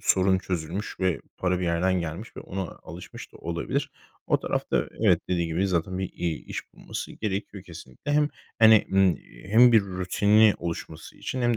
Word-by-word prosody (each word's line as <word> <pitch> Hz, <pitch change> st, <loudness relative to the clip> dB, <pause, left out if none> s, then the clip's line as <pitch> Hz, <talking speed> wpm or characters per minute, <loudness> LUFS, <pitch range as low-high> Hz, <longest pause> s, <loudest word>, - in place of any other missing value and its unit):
sorun 95 Hz, 0 st, +3 dB
çözülmüş 90 Hz, +2 st, -4 dB
ve 95 Hz, -2 st, +1 dB, 0.2 s
para 90 Hz, -1 st, 0 dB
bir 90 Hz, -, -2 dB
yerden 85 Hz, +2 st, +1 dB
gelmiş 85 Hz, +7 st, -6 dB
ve -, -, -6 dB
ona 95 Hz, 0 st, -4 dB, 0.2 s
alışmış 85 Hz, +3 st, -10 dB
da -, -, -13 dB
olabilir. 85 Hz, 0 st, -3 dB, 0.4 s
O -, -, +2 dB
tarafta -, -, -1 dB
evet, -, -, +4 dB
dediğin 85 Hz, -2 st, 0 dB
gibi 90 Hz, +5 st, 0 dB
zaten 90 Hz, +1 st, -1 dB
bir, 95 Hz, -, -3 dB
iii, 85 Hz, -3 st, -3 dB
iş -, -, -7 dB
bulması -, -, -6 dB
gerekiyor 100 Hz, -2 st, -4 dB
kesinlikle. 85 Hz, -, -7 dB
Hem, 150 Hz, 0 st, +3 dB, 0.3 s
hani, 110 Hz, -2 st, +7 dB
ımm, 95 Hz, -2 st, +4 dB
eee, -, -, -16 dB
hem 120 Hz, +3 st, +7 dB
bir 110 Hz, -, +7 dB
rutini 100 Hz, +3 st, +3 dB
oluşması 85 Hz, -1 st, -6 dB
için 130 Hz, -1 st, -4 dB
hem 120 Hz, -1 st, +2 dB
95 Hz, 175 wpm, -26 LUFS, 85-105 Hz, 0.4 s, hani